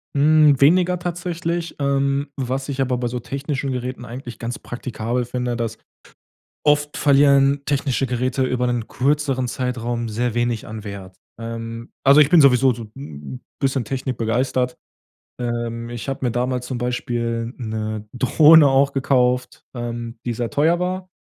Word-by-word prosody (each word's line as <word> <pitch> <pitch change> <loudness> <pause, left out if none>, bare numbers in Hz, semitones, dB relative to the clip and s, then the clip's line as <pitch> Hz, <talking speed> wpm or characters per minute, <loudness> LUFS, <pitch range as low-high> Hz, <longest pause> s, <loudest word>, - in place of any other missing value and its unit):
Mm, 150 0 +5
weniger 180 +4 +4
tatsächlich. 170 -1 -3
Ähm, 140 0 +1
was 135 0 -3
ich 135 -1 -2
aber 125 -1 0
bei 120 0 -2
so 125 +1 -3
technischen 140 +2 -3
Geräten 125 0 -4
eigentlich 120 0 -8
ganz 120 +1 -4
praktikabel 120 0 -3
finde, 125 0 -2
dass 115 -2 -3 0.9
oft 150 0 +2
verlieren 140 -1 +4
technische 135 -2 0
Geräte 130 +2 0
über 125 -1 0
'nen 120 -2 -1
kürzeren 135 -1 0
Zeitraum 120 -2 -2
sehr 120 +2 -1
wenig 120 -2 -1
an 110 -1 -7
Wert. 95 -2 -8 0.2
Ähm, 115 0 -6
also, 140 +3 +8
ich 145 - +4
bin 175 - +6
sowieso 130 -1 +5
so 115 -1 -8
'n 70 - -9 0.2
bisschen 135 -2 0
technikbegeistert. 125 0 -1 0.7
Ähm, 120 -1 -3
ich 120 +3 -7
habe 135 -1 -3
mir 120 - +2
damals 125 +1 -1
zum 125 -1 -4
Beispiel 120 -1 -2
'ne 110 -2 -4
Drohne 150 +4 +6
auch 135 +1 +3
gekauft, 125 -2 +1
ähm, 120 -1 -5
die 120 - -1
sehr 115 0 -3
teuer 160 +4 +2
war. 185 +1 -3
125 Hz, 150 wpm, -21 LUFS, 120-140 Hz, 0.9 s, also